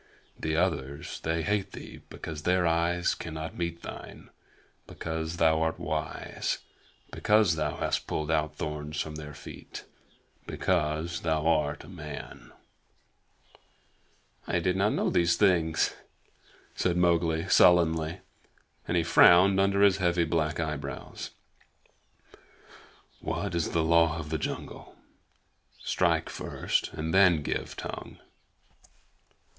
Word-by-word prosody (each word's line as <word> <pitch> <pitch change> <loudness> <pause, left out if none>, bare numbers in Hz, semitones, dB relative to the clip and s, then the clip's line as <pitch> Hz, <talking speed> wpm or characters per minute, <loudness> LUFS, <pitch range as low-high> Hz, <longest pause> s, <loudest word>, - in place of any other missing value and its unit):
The 80 0 -1
others 70 -5 -2
they 80 0 -1
hate 100 +2 -1
thee - - -10
because 80 -2 -7
their 90 +2 +2
eyes 85 +1 +1
cannot 80 -1 -6
meet 85 -1 -4
thine; - - -9 0.6
because 80 0 -4
thou 80 -1 +3
art 80 0 0
wise; 75 +1 -3 0.5
because 105 -4 +3
thou 75 -2 -2
hast - - -1
pulled 75 0 -2
out 75 -1 0
thorns 75 -1 -4
from 80 - -3
their 75 -1 -8
feet - - -10 0.6
because 85 -1 -1
thou 80 -2 0
art 75 -3 +1
a - - -13
man." 75 -8 -9 2.0
"I - - +1
did 90 - +1
not 100 +3 +2
know - - 0
these 85 0 +3
things," 85 -5 +2 0.8
said 90 -1 0
Mowgli 85 -1 +2
sullenly, 85 -1 +4 0.7
and 90 - +1
he 85 - +3
frowned 90 +3 +6
under 100 +1 +3
his 100 -2 +5
heavy 85 -2 +2
black 80 -1 0
eyebrows. 75 -3 -5 1.9
"What - - -3
is 85 -2 0
the 80 - +1
Law 85 0 +4
of 80 -1 -6
the 80 - -1
Jungle? - - -6 0.8
Strike - - +1
first - - -2
and 80 +1 -3
then 90 -5 +5
give - - -3
tongue. - - -7
80 Hz, 120 wpm, -28 LUFS, 80-90 Hz, 2.0 s, frowned